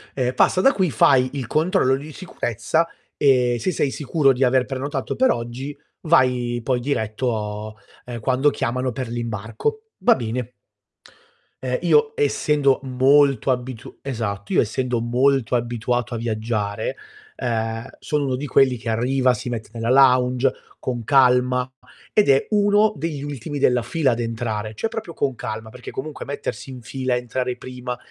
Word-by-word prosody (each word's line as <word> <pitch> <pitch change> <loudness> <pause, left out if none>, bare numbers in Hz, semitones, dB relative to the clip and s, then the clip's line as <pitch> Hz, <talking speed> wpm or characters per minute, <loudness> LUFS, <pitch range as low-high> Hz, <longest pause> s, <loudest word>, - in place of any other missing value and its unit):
Ehm, 125 -1 0
passa 185 +7 +3
da 270 - +6
qui, 185 -6 +1
fai 130 -2 +4
il 135 -5 -4
controllo 155 -3 +2
di 145 +3 -7
sicurezza 160 - -1 0.3
e 125 -4 +3
se 185 - 0
sei 145 -4 0
sicuro 145 -1 +2
di 130 +1 0
aver 125 0 +3
prenotato 135 +1 -3
per 260 0 +4
oggi 120 +5 -4 0.3
vai 125 -6 +2
poi 125 -1 +1
diretto, 110 -4 -2 0.3
ehm, 120 -1 -6
quando 130 +5 +2
chiamano 125 0 -2
per 125 0 -5
l'imbarco. 115 - -3 0.2
Va 185 - +5
bene. 120 0 -4 1.1
Uhm, 125 -1 -1
io, 150 -4 +3
essendo 145 -1 +2
molto 135 0 +3
abitu 125 -2 -3
esatto, 110 -6 -4
io - - +5
essendo 120 +2 -1
molto 125 +2 +2
abituato 120 +1 -1
a - - -2
viaggiare, 110 -2 -2 0.4
ehm, 115 0 -2
sono 150 -1 -1
uno 130 -2 0
di 140 +3 -4
quelli 130 -1 +3
che 115 0 -5
arriva, 125 +3 +2
si 125 +1 -5
mette 115 -3 -5
nella 115 0 -3
lounge 130 0 +4 0.3
con 120 -2 -3
calma 125 0 +3 0.4
ed 210 -6 +4
è 135 0 +4
uno 210 +1 +4
degli 150 -2 -4
ultimi 145 0 -5
della 125 -3 +3
fila 135 +3 +1
ad 120 - -2
entrare, 110 -2 -3
cioè 225 - -1
proprio 195 -8 -6
con 135 -2 0
calma 110 -2 -6
perché 125 +1 -10
comunque 150 +3 -6
mettersi 140 -1 -5
in 130 -2 -8
fila, 130 +3 -2
entrare 125 +1 -2
prima, 125 -1 -6
125 Hz, 155 wpm, -22 LUFS, 120-140 Hz, 1.1 s, da